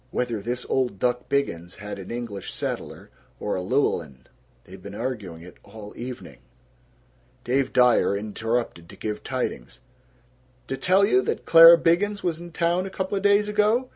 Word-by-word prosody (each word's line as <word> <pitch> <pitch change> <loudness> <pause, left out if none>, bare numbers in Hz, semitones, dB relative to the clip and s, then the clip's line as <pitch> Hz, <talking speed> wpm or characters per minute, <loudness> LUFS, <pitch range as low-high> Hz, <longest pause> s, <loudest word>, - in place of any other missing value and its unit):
("Whether 120 -3 -2
this 120 +4 -4
old 125 -6 0
duck 125 +4 -1
Biggins 90 -11 -2
had 105 0 -8
an 95 - -9
English 115 -5 -6
setter - - -5 0.3
or 105 - -2
a 90 - -2
Llewellyn. 85 - -1 0.4
They've 95 +1 -13
been 100 +1 -9
arguing 105 -9 -5
it 90 - -14
all 105 0 -12
evening!") 125 +1 -8 1.0
Dave 130 +2 0
Dyer 125 -5 +3
interrupted 110 -3 -3
to - - -12
give 105 -1 -5
tidings, 125 - -4 0.9
"D' - - -5
tell 185 +7 +3
you 130 -9 +3
that - - -3
Clara 165 +1 +9
Biggins 200 +5 +1
was 170 -2 -1
in 175 0 -10
town 175 +3 0
couple 190 +1 -3
days 200 +1 +3
ago? 215 +5 +1
125 Hz, 155 wpm, -24 LUFS, 100-170 Hz, 1.0 s, Clara